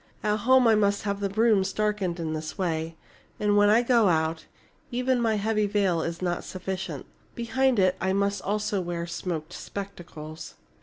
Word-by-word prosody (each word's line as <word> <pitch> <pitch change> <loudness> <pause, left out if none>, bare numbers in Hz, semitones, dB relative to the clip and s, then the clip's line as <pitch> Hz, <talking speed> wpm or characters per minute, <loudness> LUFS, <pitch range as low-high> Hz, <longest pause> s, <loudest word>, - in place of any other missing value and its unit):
At 210 0 +1
home 255 +3 +4
I 225 - +6
must 205 -1 +2
have 200 -1 -2
the 200 -1 -1
rooms 205 -2 +2
darkened 205 -4 -1
in 160 -1 -2
this 155 0 -5
way. 165 -3 -2 0.4
And 210 -1 +2
when 205 0 +5
I 225 +3 +5
go 235 -3 +4
out, 160 -1 0 0.4
even 250 0 0
my 225 -2 +2
heavy 215 0 +1
veil 195 -5 +1
is 165 +2 -4
not 175 -1 -1
sufficient. 185 -5 -5 0.3
Behind 255 +2 +1
it 185 -1 +3
I 190 - +1
must 200 +1 0
also 205 -1 -1
wear 170 -1 -3
smoked 170 -1 -4
spectacles." 175 -6 -8
200 Hz, 170 wpm, -26 LUFS, 175-215 Hz, 0.4 s, I